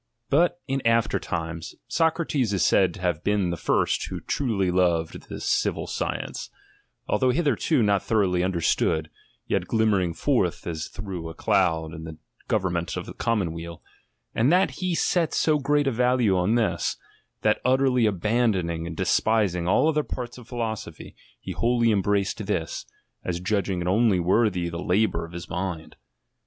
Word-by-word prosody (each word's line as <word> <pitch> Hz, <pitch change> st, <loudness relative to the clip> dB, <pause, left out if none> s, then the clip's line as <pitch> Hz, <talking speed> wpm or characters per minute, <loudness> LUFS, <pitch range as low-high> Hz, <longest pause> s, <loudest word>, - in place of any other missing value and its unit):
But 170 Hz, +4 st, +3 dB
in 135 Hz, 0 st, -1 dB
after 115 Hz, 0 st, +2 dB
times, 85 Hz, -1 st, -5 dB
Socrates 160 Hz, -, +1 dB
is 95 Hz, -, +2 dB
said 95 Hz, 0 st, +3 dB
to 95 Hz, -, -10 dB
have 85 Hz, -3 st, -1 dB
been 100 Hz, -4 st, +1 dB
the -, -, -1 dB
first -, -, 0 dB
who -, -, -5 dB
truly 105 Hz, -9 st, -1 dB
loved 85 Hz, -3 st, 0 dB
this -, -, -6 dB
civil -, -, 0 dB
science; -, -, -4 dB, 0.6 s
although 130 Hz, -, +2 dB
hitherto 145 Hz, -1 st, +2 dB
not 100 Hz, -2 st, +2 dB
thoroughly 95 Hz, -6 st, +1 dB
understood, 80 Hz, -3 st, 0 dB, 0.3 s
yet -, -, -1 dB
glimmering 100 Hz, -7 st, +1 dB
forth 120 Hz, -, 0 dB
as 80 Hz, -2 st, -4 dB
through 95 Hz, -4 st, -6 dB
a 80 Hz, -, -9 dB
cloud 85 Hz, -7 st, +1 dB
in 80 Hz, -1 st, -8 dB
the 80 Hz, -1 st, -8 dB, 0.3 s
govern 95 Hz, -4 st, 0 dB
ment 85 Hz, 0 st, -2 dB
of -, -, -4 dB
the -, -, -8 dB
commonweal: 85 Hz, -7 st, -2 dB, 0.5 s
and 120 Hz, +6 st, +3 dB
that 185 Hz, +2 st, +4 dB
he 180 Hz, -2 st, 0 dB
set 165 Hz, -1 st, +1 dB
so 155 Hz, -2 st, +2 dB
great 145 Hz, +1 st, +2 dB
a 135 Hz, -, +2 dB
value 125 Hz, -4 st, +2 dB
on 90 Hz, +5 st, +2 dB
this, 115 Hz, -3 st, 0 dB, 0.5 s
that 110 Hz, 0 st, +2 dB
utterly 130 Hz, -2 st, +3 dB
abandoning 95 Hz, -5 st, 0 dB
and 80 Hz, -2 st, -7 dB
de -, -, 0 dB
spising 100 Hz, -6 st, +2 dB
all 100 Hz, -, +3 dB
other 155 Hz, -1 st, +2 dB
parts 125 Hz, -3 st, -6 dB
of 120 Hz, -, -14 dB
philosophy, 115 Hz, -4 st, -5 dB, 0.2 s
he -, -, -7 dB
wholly 120 Hz, -1 st, +2 dB
embraced 100 Hz, -1 st, 0 dB
this, -, -, -2 dB, 0.4 s
as 85 Hz, -1 st, -2 dB
judging 95 Hz, -1 st, -1 dB
it 85 Hz, -, -3 dB
only 100 Hz, 0 st, +3 dB
worthy 90 Hz, 0 st, +2 dB
the 85 Hz, 0 st, -5 dB
labour 100 Hz, -1 st, +1 dB
of 85 Hz, -, -13 dB
his 85 Hz, 0 st, -7 dB
mind. 90 Hz, -2 st, -4 dB
100 Hz, 165 wpm, -25 LUFS, 85-120 Hz, 0.6 s, that